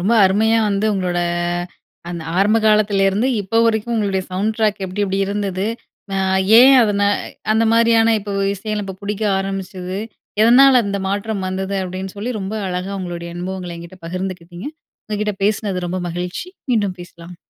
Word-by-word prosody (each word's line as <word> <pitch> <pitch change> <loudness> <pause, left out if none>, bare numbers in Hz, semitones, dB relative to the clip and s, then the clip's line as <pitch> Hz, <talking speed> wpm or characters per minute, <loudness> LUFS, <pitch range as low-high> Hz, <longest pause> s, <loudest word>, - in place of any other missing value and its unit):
ரொம்ப 200 +6 +1
அருமையா 220 +4 +3
வந்து 205 +1 0
உங்களோட 180 -2 -1 0.9
அந்த 170 -2 -5 0.2
ஆரம்ப 205 +3 +4
காலத்துல 210 -2 +3
இருந்து, 210 +7 +1
இப்ப 225 +4 +1
வரைக்கும். 230 +1 0
உங்களுடைய 195 -3 0
சவுண்ட் 210 +4 0
டிராக் 210 -3 0
எப்படி, 190 +3 -3
எப்படி 195 0 -2
இருந்தது. 200 -1 -2 0.5
அ - - +1 0.4
ஏன் 265 +2 +8
அதன 205 -2 +1 0.5
அந்த 220 +1 +3
மாரியான 230 0 +4
இப்போ 200 0 -6 0.2
இசை 215 +2 -4
இப்போ 190 -1 -6
பிடிக்க 210 +1 -3 0.2
ஆரம்பிச்சது, 195 -1 -4 0.4
எதனால 255 +3 +7
அந்த 200 0 -2
மாற்றம் 200 0 -2
வந்தது, 190 +1 -3
அப்படின்னு 185 +1 -5
சொல்லி 230 +5 -3
ரொம்ப 195 +2 -4
அழகா 180 +2 -3
உங்களுடைய 170 -1 -5
அனுபவங்கள 180 -1 -5
என்கிட்ட 170 +2 -11
பகிர்ந்துக்கிட்டீங்க. 180 +2 -5 0.4
உங்க 215 - -3
கிட்ட 210 -1 -1
பேசினது 200 -3 0
ரொம்ப 185 +1 -2
மகிழ்ச்சி. 180 - -5 0.2
மீண்டும் 205 -6 +1
பேசலாம். 175 0 -11
195 Hz, 155 wpm, -19 LUFS, 185-215 Hz, 0.9 s, ஏன்